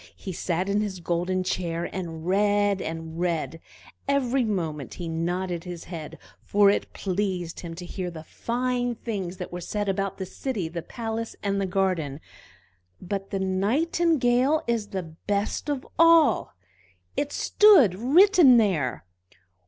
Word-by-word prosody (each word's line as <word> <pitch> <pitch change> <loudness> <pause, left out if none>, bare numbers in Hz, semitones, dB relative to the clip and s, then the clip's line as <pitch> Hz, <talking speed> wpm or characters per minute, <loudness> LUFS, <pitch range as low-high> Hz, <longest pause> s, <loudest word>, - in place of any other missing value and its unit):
He 190 - -7
sat 175 +2 -1
in 200 +1 +1
his 195 -3 -3
golden 175 +2 -1
chair, 170 -2 -2
and 165 -3 -5
read, 205 +1 +2
and 165 0 -5
read; 165 -2 -1 0.5
every 270 -2 +2
moment 165 - -3
he 175 - -5
nodded 175 +1 -2
his 175 -2 -7
head, 165 -4 -8 0.2
for 200 -1 +4
it - - -2
pleased 185 -3 -2
him 165 -2 -7
to 175 +1 -8
hear 180 0 -4
the 160 -2 -9
fine 245 +5 -2
things 195 -6 -4
that 180 - -6
were 175 0 -5
said 205 +3 -3
about 195 0 -1
the 190 - -4
city, 200 -2 -3
the 170 +1 -5
palace, 225 +4 -5
and 200 -1 0
the 195 - 0
garden. 180 -7 0 0.8
"But 195 +1 -4
the 195 - -2
Nightingale 255 - +2
is 230 -3 -1
the 190 -2 -4
best 200 - -3
of 285 -2 -2
all!" 330 -2 +5 0.6
it 290 0 -1
stood 390 - +5
written 290 - +6
there. 165 - +1
195 Hz, 145 wpm, -26 LUFS, 175-235 Hz, 0.8 s, written